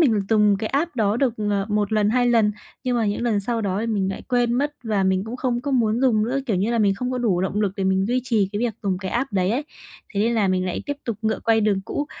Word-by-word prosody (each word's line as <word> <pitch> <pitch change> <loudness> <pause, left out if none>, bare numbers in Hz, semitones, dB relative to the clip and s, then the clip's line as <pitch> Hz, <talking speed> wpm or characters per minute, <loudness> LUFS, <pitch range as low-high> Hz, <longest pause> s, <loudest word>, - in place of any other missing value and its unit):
mình 230 -10 +4
dùng 210 -2 +4
cái 215 - -2
app 295 +2 -1
đó 215 -1 +2
được, 250 -3 +1 0.2
ờ, 200 0 0
1 210 0 0
lần, 210 -1 +3
2 245 +1 +2
lần, 225 -3 +3 0.3
nhưng 250 -1 +1
mà 225 -3 +1
những 205 +3 -1
lần 225 -4 +1
sau 230 +3 -2
đó 200 -1 -1
thì 230 - -2
mình 200 -4 0
lại - - -6
quên 245 -2 +2
mất 290 +4 0
và 210 -3 0
mình 190 +1 +1
cũng 235 +3 -6
không 245 -2 -1
có 285 - -3
muốn 235 -3 +2
dùng 240 -5 +3
nữa. 255 +4 -1
Kiểu 215 -7 +1
như 200 +5 0
là, 235 - +1
mình 200 -3 +3
không 250 +5 -3
có 250 - -1
đủ 205 -7 +1
động 195 +3 -1
lực 200 -3 +1
để 195 - -1
mình 190 +1 +2
duy 250 +2 +1
trì 215 -6 +1
cái 205 - -2
việc 235 -4 -1
dùng 190 -3 -1
cái 190 -1 -5
app 245 +1 -1
đấy 185 -1 +1
ấy. 260 +7 -1 0.5
Thế 200 - +1
nên 230 +3 +2
là 210 -4 +2
mình 185 0 +1
lại 180 - -3
tiếp 285 - -2
tục 230 -4 -3
ngựa 220 0 0
quay 225 -1 +3
đường 205 -2 +1
cũ. 290 +9 -4
220 Hz, 300 wpm, -23 LUFS, 200-245 Hz, 0.5 s, mình